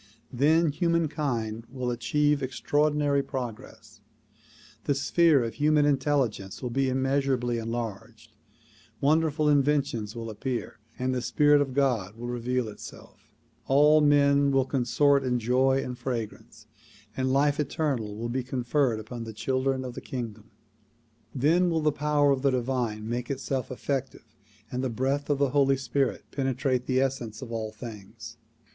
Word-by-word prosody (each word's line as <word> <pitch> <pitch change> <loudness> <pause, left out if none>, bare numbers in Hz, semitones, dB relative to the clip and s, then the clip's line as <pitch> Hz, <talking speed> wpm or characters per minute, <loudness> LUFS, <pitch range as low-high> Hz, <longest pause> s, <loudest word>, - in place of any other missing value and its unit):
Then 155 +5 +3
humankind 145 - -1
will 125 -1 -3
achieve 145 +5 +1
extraordinary 145 +2 +1
progress, 125 -5 -7 0.8
the 145 - +1
sphere 150 0 +3
of 115 - -4
human 150 0 +3
intelligence 135 -9 0
will 125 - -3
be 135 +2 +1
immeasurably 130 -2 0
enlarged, 115 -3 -6 0.7
wonderful 155 +1 +2
inventions 140 -7 +1
will 115 -1 -5
appear 125 +2 -4 0.2
and 130 +1 -1
the 125 - -1
spirit 145 +3 +4
of 135 -3 -2
God 120 -8 +1
will 120 +1 -8
reveal 125 0 -1
itself; 105 - -12 0.4
all 150 +3 +5
men 140 -1 +4
will 135 -1 +2
consort 140 +2 +2
in 125 -1 0
joy 130 +3 +2
and 125 - -5
fragrance, 120 -4 -5 0.5
and 130 0 0
life 145 +2 +2
eternal 135 -7 -1
will 115 +2 -3
be 130 +2 -2
conferred 125 -1 0
upon 115 +2 -7
the 110 -1 -7
children 130 +4 -1
of 125 - -6
the - - -7
kingdom. 110 -4 -6 0.9
Then 165 +7 +3
will 165 -1 0
the 150 0 +2
power 145 0 +2
of 135 -1 0
the 140 - +3
divine 120 -4 -2
make 120 +1 -3
itself 135 -2 -3
effective 130 -3 -4 0.4
and 125 +1 -2
the 130 - 0
breath 135 +5 -1
of 145 - +2
the 140 -1 +2
Holy 135 -1 +3
Spirit 135 -1 -1
penetrate 130 -2 -1
the 130 -1 +2
essence 130 -4 -2
of 120 - -9
all 110 -2 -3
things. 110 +1 -10
130 Hz, 145 wpm, -27 LUFS, 120-145 Hz, 0.9 s, all